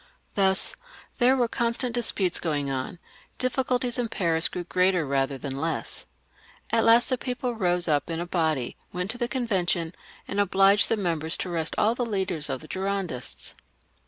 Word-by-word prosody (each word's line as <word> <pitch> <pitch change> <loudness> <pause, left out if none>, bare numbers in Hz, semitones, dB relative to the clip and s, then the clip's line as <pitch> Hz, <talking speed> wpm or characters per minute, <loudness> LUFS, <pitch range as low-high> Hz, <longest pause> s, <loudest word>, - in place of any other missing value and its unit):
Thus 190 -1 +2 0.5
there 255 +1 +5
were 245 -2 +2
constant 235 +1 -1
disputes 205 -6 +1
going 145 -4 -1
on; 130 +6 -4 0.4
diffi 255 +1 +1
culties 250 -1 0
in 235 -2 0
Paris 165 -5 +1
grew 180 - -5
greater 180 -1 +2
rather 135 0 0
than 135 +1 -5
less. 160 +4 -3 0.6
At 225 - +3
last 230 +3 +6
the 255 -2 0
people 250 -1 -3
rose 180 -5 +4
up 145 -2 +1
in 165 0 -2
a 175 - -2
body, 160 -8 -1
went 180 +3 -1
to 245 - -6
the 240 - 0
Convention, 185 -9 0 0.3
and 200 - -2
obliged 200 +1 +4
the 225 - +2
members 165 -4 0
to 185 - -4
arrest 165 -2 -1
all 220 +2 +3
the 245 - -2
leaders 190 -9 -2
of 130 - -3
the 155 - -11
Girondists. 190 -9 -3
190 Hz, 175 wpm, -26 LUFS, 165-230 Hz, 0.6 s, last